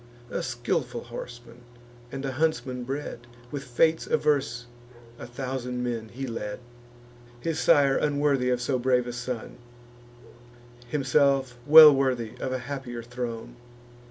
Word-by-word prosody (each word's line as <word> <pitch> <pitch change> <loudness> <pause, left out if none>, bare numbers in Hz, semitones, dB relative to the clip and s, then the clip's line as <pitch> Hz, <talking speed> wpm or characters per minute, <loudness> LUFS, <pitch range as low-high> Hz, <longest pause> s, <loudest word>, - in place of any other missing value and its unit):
A - - -2
skilful 120 -1 -2
horseman, 120 0 -10 0.5
and 135 0 -5
a 135 - -2
huntsman 130 -4 -1
bred, 135 -3 -5 0.2
With 140 -2 -4
fates 160 +6 +1
averse 140 -5 0 0.5
a 120 - -8
thousand 125 0 -4
men 115 -2 -3
he 135 +4 -6
led: 105 -4 -5 0.8
His 160 +4 -2
sire 140 -2 +4
unworthy 145 -3 +1
of 125 -1 +1
so 130 +1 -1
brave 125 -1 +2
a 120 - -5
son; 125 -1 -5 1.3
Himself 135 -1 +2
well 155 0 +11
worthy 130 -5 0
of 130 - -3
a 130 - -1
happier 130 -4 -6
throne. 120 0 -6
125 Hz, 130 wpm, -26 LUFS, 120-140 Hz, 1.3 s, well